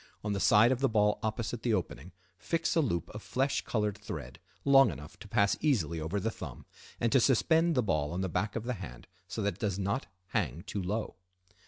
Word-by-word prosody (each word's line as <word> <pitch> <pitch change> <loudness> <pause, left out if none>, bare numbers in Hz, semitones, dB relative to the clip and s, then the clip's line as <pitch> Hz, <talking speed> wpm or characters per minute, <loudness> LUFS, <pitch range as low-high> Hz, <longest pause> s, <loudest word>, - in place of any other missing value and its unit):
On 105 -1 -1
the 100 - -1
side 105 +5 +6
of 130 - +1
the 135 - +2
ball 105 -1 +2
opposite 110 +1 -2
the 115 -2 +2
opening 90 -3 -4 0.3
fix 165 0 -1
a 165 - +5
loop 85 - -1
of 105 - -8
flesh 135 +4 0
colored 105 -3 0
thread, 75 -12 -7 0.3
long 135 -2 +7
enough 75 +3 -9
to 100 - -10
pass 100 -1 +3
easily 95 - +1
over 80 +6 -2
the 115 +4 -1
thumb, - - -9 0.3
and 115 - +1
to 135 - +5
suspend 160 +7 +3
the 125 - +3
ball 75 -8 0
on 90 +2 -2
the 95 - 0
back 95 +4 -2
of 115 - -2
the 125 +1 -2
hand - - -9 0.2
so 95 +4 -4
that 100 -1 +1
it 90 - -19
does 100 -3 -1
not 100 -2 -1 0.2
hang 80 +8 -1
too 100 - -4
low. 105 +4 -3
105 Hz, 220 wpm, -31 LUFS, 90-120 Hz, 0.3 s, long